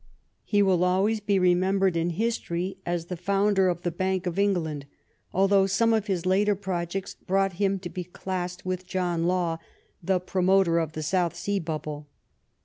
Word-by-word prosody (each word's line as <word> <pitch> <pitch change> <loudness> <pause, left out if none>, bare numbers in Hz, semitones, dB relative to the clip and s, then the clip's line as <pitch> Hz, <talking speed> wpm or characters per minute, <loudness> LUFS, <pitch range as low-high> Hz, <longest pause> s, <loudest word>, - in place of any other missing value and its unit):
He 205 -1 +2
will 185 -3 +3
always 195 +5 +2
be 205 -1 +1
remembered 185 +1 +2
in 165 +1 +1
history 185 -2 -2
as 175 -1 -1
the 180 - -5
founder 195 +1 +2
of 175 0 -3
the 175 - 0
Bank 185 +2 -1
of 180 +1 -2
England, 160 -8 0 0.4
al 195 +2 +3
though 195 -1 +4
some 225 +4 +2
of 220 -1 0
his 185 -4 -1
later 200 +2 +3
projects 185 -1 -3
brought 195 0 0
him 195 -1 +2
to 185 -1 -7
be 180 +1 -5
classed 180 0 -5
with 185 0 -3
John 175 -2 -1
Law, 175 -2 0 0.4
the 185 +1 +1
promoter 185 -1 +2
of 160 -2 -2
the 155 - -4
South 175 +2 0
Sea 200 0 -1
Bubble. 155 -3 -5
185 Hz, 175 wpm, -26 LUFS, 175-195 Hz, 0.4 s, though